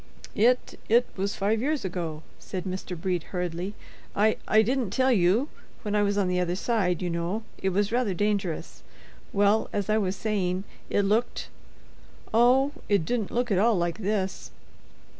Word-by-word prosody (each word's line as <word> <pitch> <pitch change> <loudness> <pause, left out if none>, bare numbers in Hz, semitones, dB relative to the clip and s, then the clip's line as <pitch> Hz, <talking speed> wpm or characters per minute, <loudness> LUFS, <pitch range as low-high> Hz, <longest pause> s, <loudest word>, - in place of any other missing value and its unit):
"It—it 240 +1 +2
was 200 +1 -2
five 215 +2 +1
years 290 -2 0
ago," 165 -4 -4 0.2
said 185 -2 -5
Mr. 185 -2 -5
Brede, 180 0 0
hurriedly. 180 +2 -3 0.4
"I—I 215 +1 +3
didn't 250 -1 0
tell 260 +6 +2
you—when 210 - 0
I 210 - +4
was 205 0 +1
on 200 -2 +2
the 180 0 +1
other 180 0 0
side, 190 -4 0
you 180 - -1
know—it 190 +4 -3
was 200 +2 0
rather 235 -6 +1
dangerous—well, 205 +2 -1
as 205 0 -1
I 215 - +3
was 190 -2 -1
saying—it 195 -1 -2
looked—oh, 240 +3 0 0.2
it 200 -6 +3
didn't 235 -2 -1
look 245 -1 -1
at 190 - +3
all 225 +2 +4
like 175 +2 -1
this." 195 -2 -2
205 Hz, 140 wpm, -27 LUFS, 180-220 Hz, 0.4 s, I